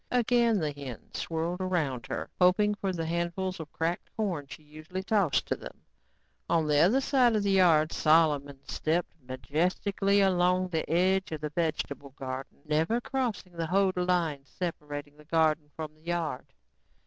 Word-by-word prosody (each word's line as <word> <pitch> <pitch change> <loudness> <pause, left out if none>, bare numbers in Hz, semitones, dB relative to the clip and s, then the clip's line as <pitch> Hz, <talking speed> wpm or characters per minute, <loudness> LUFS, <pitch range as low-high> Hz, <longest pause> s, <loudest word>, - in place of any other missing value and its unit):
Again 240 -2 +3
the 155 -5 -1
hens 140 -5 -8
swirled 170 +3 -2
about 155 -10 -1
her, - - -4
hoping 190 +3 +4
for 200 -2 -2
the 165 -3 -3
handfuls 170 +3 -2
of 160 -2 -8
cracked 165 +2 -2
corn 180 -10 -2
she 155 - -11
usually 155 +5 -7
tossed 190 -10 +2
to - - -1
them. - - -11 0.7
On 165 -2 +2
the 150 -1 +3
other 195 - +5
side 255 -4 +3
of 210 - +1
the 200 - +1
yard 165 -5 +4
Solomon 145 -3 +2
stepped 165 +2 -1
majestically 180 +10 0
along 185 -1 +3
the 160 -3 -2
edge 190 +2 +2
of 155 -2 -4
the 150 -1 -3
vegetable 145 -4 -3
garden, 130 +1 -6
never 160 +10 +1
crossing 240 -8 -3
the 165 -1 -3
hoed 190 +2 +2
line 175 -6 0
separating 145 -2 -6
garden 160 -2 +2
from 155 -1 -6
yard. 165 -4 -3
170 Hz, 155 wpm, -29 LUFS, 150-190 Hz, 0.7 s, other